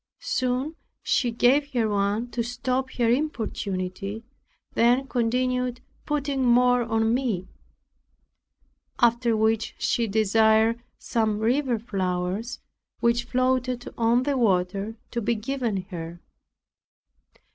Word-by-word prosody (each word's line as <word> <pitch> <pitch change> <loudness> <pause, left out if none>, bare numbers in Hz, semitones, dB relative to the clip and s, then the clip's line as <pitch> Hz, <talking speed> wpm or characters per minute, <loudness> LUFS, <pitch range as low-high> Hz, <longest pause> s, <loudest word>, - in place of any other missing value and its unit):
Soon 255 +5 -1 0.3
she 245 - +1
gave 265 +5 +2
her 235 -3 +2
one 205 +3 0
to 240 - -1
stop 255 +2 -2
her 240 -2 +1
importunity, 210 -6 -3 0.5
then 245 +3 +3
continued 250 +1 0 0.3
putting 285 -2 -1
more 245 0 +4
on 225 -1 +1
me; 230 -8 -1 1.5
after 235 -1 +3
which 220 0 +1
she 235 -1 0
desired 220 +2 +3 0.2
some 220 -2 0
river 245 +3 +1
flowers, 195 +1 -3 0.4
which 235 0 +2
floated 255 -1 0
on 235 +2 +2
the 285 +1 0
water, 195 -2 0 0.2
to 235 - -2
be 235 +2 +1
given 225 -4 -2
her. 170 0 -6
235 Hz, 105 wpm, -25 LUFS, 215-250 Hz, 1.5 s, more